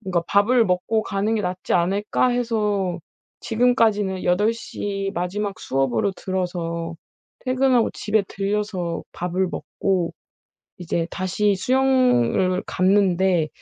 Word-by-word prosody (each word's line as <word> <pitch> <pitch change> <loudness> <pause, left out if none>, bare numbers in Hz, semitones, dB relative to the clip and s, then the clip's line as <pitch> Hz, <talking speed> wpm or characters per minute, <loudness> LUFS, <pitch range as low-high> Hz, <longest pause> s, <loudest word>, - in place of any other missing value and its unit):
뭔가 185 -5 -1
밥을 225 +4 +4
먹고 195 +4 0
가는 205 +2 -1
게 220 - 0
낫지 180 0 -3
않을까?' 200 +7 +1
해서 210 -7 0 0.4
지금까지는 220 -5 +1
8 205 +5 +3
시 200 -3 -4
마지막 195 +3 -3
수업으로 135 - 0
들어서 170 -3 -3 0.5
퇴근하고 255 -2 +2
집에 215 0 0
들러서 195 -4 -2
밥을 180 +2 -1
먹고 185 -4 -2 0.6
이제 170 -1 -2
다시 195 +2 0
수영을 250 - +2
갔는데 185 -3 +2
195 Hz, 240 characters per minute, -22 LUFS, 180-215 Hz, 0.6 s, 밥을